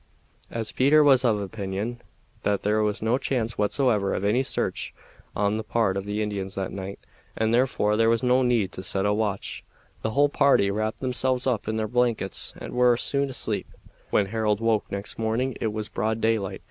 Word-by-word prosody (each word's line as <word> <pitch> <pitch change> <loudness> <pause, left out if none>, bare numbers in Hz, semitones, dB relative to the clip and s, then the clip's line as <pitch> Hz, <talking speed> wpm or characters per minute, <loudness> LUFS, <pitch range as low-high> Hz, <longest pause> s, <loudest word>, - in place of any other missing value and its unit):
As 115 -2 -4
Peter 145 +4 +4
was 135 -3 +5
of 110 -4 +2
opinion 100 +4 -4 0.4
that 100 -1 0
there 105 +1 +2
was 105 0 -1
no 115 +4 +2
chance 115 -6 -2
whatever 105 -2 +1
of - - -3
any 110 +6 +3
search 135 - -2 0.4
on 105 +1 +1
the 110 - -3
part 110 -3 0
of 100 0 -3
the 105 +1 -2
Indians 100 -2 -4
that 95 -1 -3
night, 100 0 -6 0.4
and 110 0 +1
therefore 120 -4 +2
there 115 +1 +3
was 115 +1 +1
no 125 +1 +4
need 120 -6 +1
to - - -7
set 95 +1 +1
a 105 - +2
watch, 105 -2 -2 0.4
the - - -1
whole 145 +5 +3
party 140 -8 +3
wrapped 110 +2 -2
themselves 130 0 +1
up 120 -6 -1
in 110 0 -1
their 110 0 -1
blankets 120 -4 0
and - - -8
were 125 -1 +4
soon 140 +2 0
asleep. 130 - 0 0.4
When 105 - +2
Harold 105 0 0
woke 115 -2 0
next 100 +2 -5
morning 115 +4 -1
it 110 - 0
was 105 0 -4
broad 110 +1 -2
daylight. 110 -4 0
110 Hz, 195 wpm, -25 LUFS, 105-125 Hz, 0.4 s, was